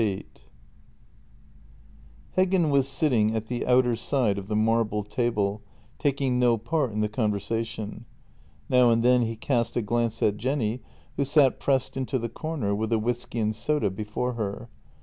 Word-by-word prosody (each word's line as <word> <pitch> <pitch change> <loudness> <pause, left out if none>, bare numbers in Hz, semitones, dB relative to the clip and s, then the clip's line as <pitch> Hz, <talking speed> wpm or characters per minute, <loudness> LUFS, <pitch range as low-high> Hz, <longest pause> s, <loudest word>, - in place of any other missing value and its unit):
VIII 105 -3 +1
H - - -10 2.1
EGGEN 185 -3 +3
was 135 -1 +3
sitting 130 -7 +1
at 110 0 -2
the 120 +1 -3
outer 125 -1 +4
side 115 -3 0
of 95 - -9
the 105 - -2
marble 110 -1 +1
table, 105 -2 -1 0.4
taking 135 -3 0
no 120 -2 +4
part 135 +3 -1
in 105 0 -2
the 105 - +2
conversation; 110 +1 -3 0.6
now 125 -1 +5
and 115 0 +3
then 125 0 +5
he 115 -1 -1
cast 120 +1 -1
a - - +2
glance 115 +1 -1
at 105 -1 +2
Jenny, 125 0 -1 0.4
who 140 - +2
sat 140 -1 +3
pressed 135 -2 0
into 130 0 -1
the 115 -1 -3
corner, 150 -11 -3
with 110 +2 -2
a 115 - +3
whisky 120 +2 -3
and 110 0 0
soda 120 -2 0
before 105 +5 -3
her. 110 +1 -4
115 Hz, 165 wpm, -26 LUFS, 105-130 Hz, 2.1 s, now